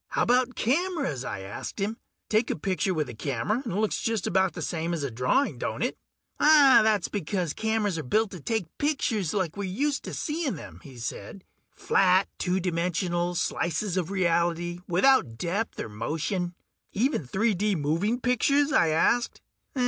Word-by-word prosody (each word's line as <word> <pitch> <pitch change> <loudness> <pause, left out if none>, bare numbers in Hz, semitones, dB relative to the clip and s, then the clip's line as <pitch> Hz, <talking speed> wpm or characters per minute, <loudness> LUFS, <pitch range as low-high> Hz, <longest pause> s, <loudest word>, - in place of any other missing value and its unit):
"How - - 0
about 250 +1 +2
cameras?" 280 - 0
I 100 - -5
asked 95 +1 -7
him. 205 +3 -1 0.3
"Take 220 +2 +1
a - - -1
picture 185 +3 -1
with 155 -4 -1
a - - -7
camera 140 - -2
and 230 - -4
it - - -3
looks 215 +1 0
just 225 -2 -1
about 190 0 +2
the - - -6
same 170 +1 -2
as 155 - -4
a 140 - -2
drawing, 125 - +1
don't - - -2
it?" - - -1 0.4
"That's 265 - +6
because 180 -4 -2
cameras 220 -5 0
are - - -4
built 215 - +1
to 180 - -8
take 205 0 -3
pictures 235 - 0
like 185 -6 -1
we're 200 -2 -3
used 280 +9 0
to - - -5
seeing 300 - -2
them," 150 - -10
he 135 -3 -13
said. 120 - -6 0.3
"Flat, 190 0 +3
two 180 +1 0
dimensional 175 0 -1
slices 175 +2 -1
of 180 -2 -1
reality, 175 -2 0
without 180 - +3
depth 195 - -2
or - - -3
motion." 165 - -3 0.4
"Even 220 - 0
3 215 - +1
D 205 +2 0
moving 170 +10 0
pictures?" 275 +4 +2
I 170 - +4
asked. 235 +10 +1
190 Hz, 170 wpm, -27 LUFS, 165-225 Hz, 0.4 s, That's